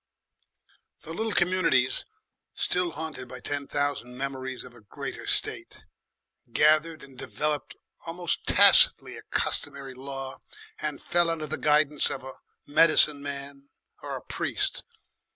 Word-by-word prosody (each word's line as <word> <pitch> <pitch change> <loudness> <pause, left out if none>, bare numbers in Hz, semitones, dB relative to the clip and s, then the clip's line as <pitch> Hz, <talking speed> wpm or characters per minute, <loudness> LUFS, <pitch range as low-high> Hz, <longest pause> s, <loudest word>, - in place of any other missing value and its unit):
The 160 - -8
little 220 +5 -2
communities, 175 -9 +2 0.5
still 180 -2 0
haunted 155 -4 -6
by 125 0 -9
ten 140 +2 -4
thousand 145 -4 -2
memories 130 -1 -4
of 125 - -13
a 120 - -17
greater 105 - -7
state, - - -2 0.7
gathered 155 +4 +3
and 135 -1 -14
developed 150 +3 -3 0.3
almost 170 +1 -3
tacitly - - +6
a - - -9
customary 135 -1 -1
law 135 0 -7 0.4
and 150 -2 -3
fell 175 -1 +1
under 165 -2 -2
the 150 - -3
guidance 150 -1 +2
of 130 - -5
a 130 0 -10 0.3
medicine 150 -1 +4
man 140 0 -7 0.3
or - - -5
a - - -8
priest. - - -2
145 Hz, 130 wpm, -27 LUFS, 135-160 Hz, 0.7 s, tacitly